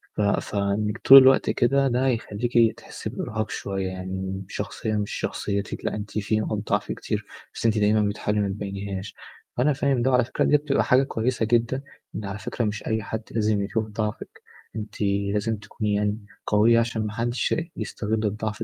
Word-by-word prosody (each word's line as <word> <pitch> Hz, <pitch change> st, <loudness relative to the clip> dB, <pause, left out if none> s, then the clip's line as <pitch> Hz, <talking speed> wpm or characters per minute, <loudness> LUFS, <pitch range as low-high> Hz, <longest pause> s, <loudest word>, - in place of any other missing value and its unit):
ف -, -, -1 dB
فإنِّك 100 Hz, +1 st, 0 dB
طول 135 Hz, -, +9 dB
الوقت 130 Hz, 0 st, +5 dB
كده 135 Hz, +3 st, +3 dB
ده 125 Hz, +1 st, +1 dB
هيخلّيكِ 115 Hz, -1 st, +1 dB
تحسي -, -, -7 dB
بإرهاق 110 Hz, -1 st, -3 dB
شوية، 95 Hz, -1 st, -3 dB
يعني 95 Hz, +1 st, -5 dB
شخصية 110 Hz, -1 st, -3 dB
مش 105 Hz, -1 st, -2 dB
شخصيتِك 100 Hz, -1 st, -3 dB
لأ -, -, -1 dB
أنتِ 105 Hz, 0 st, -6 dB
في 105 Hz, +1 st, 0 dB
نقط 110 Hz, 0 st, -1 dB
ضعف -, -, 0 dB
كتير -, -, -3 dB, 0.3 s
بس -, -, -6 dB
أنتِ 110 Hz, -1 st, +3 dB
دايمًا 105 Hz, +1 st, +3 dB
بتحاولي 105 Hz, 0 st, -1 dB
ما 100 Hz, -, +1 dB
تبينيهاش. 100 Hz, 0 st, -5 dB, 0.4 s
وأنا 140 Hz, +5 st, +3 dB
فاهم 135 Hz, -2 st, +1 dB
ده 130 Hz, +2 st, +2 dB
وعلى 125 Hz, -2 st, +4 dB
فكرة 130 Hz, -, -1 dB
ديّة 150 Hz, -, +5 dB
بتبقى 145 Hz, -1 st, +1 dB
حاجة 130 Hz, 0 st, +4 dB
كويسة 120 Hz, -2 st, -1 dB
جدًا، 120 Hz, +4 st, +1 dB, 0.3 s
لأن 105 Hz, -, -5 dB
على 100 Hz, +1 st, -5 dB
فكرة 115 Hz, +4 st, -2 dB
مش 105 Hz, 0 st, -3 dB
أي 110 Hz, -1 st, 0 dB
حد 110 Hz, +2 st, -4 dB
لازم 105 Hz, -2 st, +1 dB
يشوف 110 Hz, +2 st, -1 dB
ضعفِك، 105 Hz, 0 st, -5 dB, 0.3 s
أنتِ 105 Hz, -1 st, -6 dB, 0.3 s
لازم 110 Hz, +1 st, 0 dB
تكوني 105 Hz, 0 st, -3 dB
يعني 105 Hz, +1 st, 0 dB, 0.3 s
قوية 110 Hz, +3 st, +5 dB
عشان 115 Hz, -2 st, -1 dB
ما 105 Hz, -, -6 dB
حدش 120 Hz, +1 st, 0 dB, 0.2 s
يستغل 110 Hz, 0 st, -2 dB
الضعف 110 Hz, +1 st, -2 dB
110 Hz, 175 wpm, -25 LUFS, 105-120 Hz, 0.4 s, طول